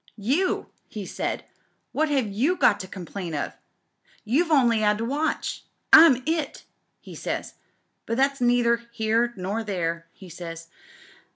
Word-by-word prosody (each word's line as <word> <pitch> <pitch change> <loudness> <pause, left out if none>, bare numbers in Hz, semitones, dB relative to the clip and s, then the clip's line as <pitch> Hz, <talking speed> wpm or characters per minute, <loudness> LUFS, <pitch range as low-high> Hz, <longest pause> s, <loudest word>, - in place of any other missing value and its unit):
"'You!' 280 - 0 0.2
he 210 -3 -7
said. - - -3 0.5
'What 310 +1 +1
have 275 -5 +1
you 245 - +1
got 210 - +3
to 185 - -6
com 185 -1 -8
plain 175 -3 -5
of? 145 - -3 0.4
— - - -32
^you've 315 +10 +2
only 240 -7 +4
'ad 210 0 +3
to 225 - -2
watch. 290 +6 -2 0.3
I'm 270 -6 +8
i^,' 315 -2 -2 0.4
he - - -12
says, - - -4 0.5
'but 230 - -1
that's 275 0 +1
neither 240 -1 +3
here 230 +1 +1
nor 200 +5 -2
there,' 170 -5 -3
he 190 - -14
says. 165 -1 -8
230 Hz, 155 wpm, -25 LUFS, 195-275 Hz, 0.5 s, I'm